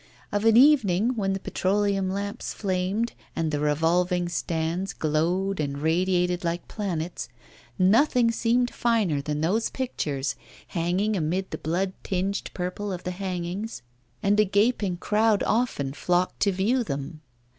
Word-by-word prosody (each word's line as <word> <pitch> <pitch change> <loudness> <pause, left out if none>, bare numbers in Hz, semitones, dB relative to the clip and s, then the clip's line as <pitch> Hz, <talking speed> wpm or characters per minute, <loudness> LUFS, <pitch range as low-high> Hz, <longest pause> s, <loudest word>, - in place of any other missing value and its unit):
Of 205 +1 0
an 225 0 +6
evening, 245 -5 +5
when 195 -3 0
the 195 - -2
petroleum 195 0 0
lamps 200 +3 -4
flamed 195 +4 -1 0.2
and 165 -2 -1
the 145 - -1
revolving 175 +4 +1
stands 170 +2 -2
glowed 175 +5 0
and 140 -2 -2
radiated 180 +3 +1
like 170 0 -2
planets, 180 -5 -4 0.5
nothing 230 +5 +4
seemed 245 +2 +1
finer 215 -12 +1
than 150 +1 -3
those 205 +8 +1
pictures 145 - -2 0.3
hanging 180 +5 0
amid 180 +2 -1
the - - -4
blood 185 +4 -1
tinged 195 +1 -2
purple 185 +3 -3
of 180 -1 -5
the 180 - -3
hangings, 180 - -4 0.4
and 205 +1 +3
a - - +7
gaping 205 -2 +1
crowd 215 +2 +2
often 215 - 0
flocked 180 +4 0
to 200 - +3
view 215 +7 +1
them. 145 -2 -5
185 Hz, 140 wpm, -26 LUFS, 170-210 Hz, 0.5 s, a